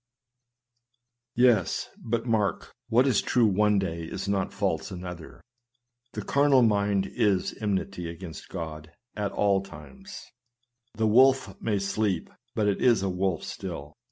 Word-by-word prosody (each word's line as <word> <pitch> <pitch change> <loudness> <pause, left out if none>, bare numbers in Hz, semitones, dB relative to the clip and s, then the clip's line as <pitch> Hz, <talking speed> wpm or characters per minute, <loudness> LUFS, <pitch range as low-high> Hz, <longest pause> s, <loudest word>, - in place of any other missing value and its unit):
' 120 0 -52
Yes, 120 -7 +3
but 115 +1 -3
mark, 110 -4 -1 0.2
what 120 +3 +4
is 130 -7 +3
true 120 -1 +2
one 105 0 +3
day 85 -4 -2
is 90 +4 -5
not 100 -1 0
false - - -1
another; 90 -2 -8 0.3
" 120 0 -50
the - - -4
carnal 140 -2 +4
mind 100 -3 +2
is 95 -4 0
enmity 95 -4 -2
against 85 -3 -9
God 80 -1 -7
" 120 - -49
at 100 - -2
ail 100 -2 +2
times. 140 - -11 0.7
The 110 - 0
wolf 130 -1 +4
may 105 -3 0
sleep, 100 -2 -1 0.2
but 105 -2 +1
it 100 - 0
is 115 -6 +4
a 95 - 0
wolf 90 -2 -1
still. 75 +2 -7
105 Hz, 150 wpm, -27 LUFS, 95-120 Hz, 0.7 s, what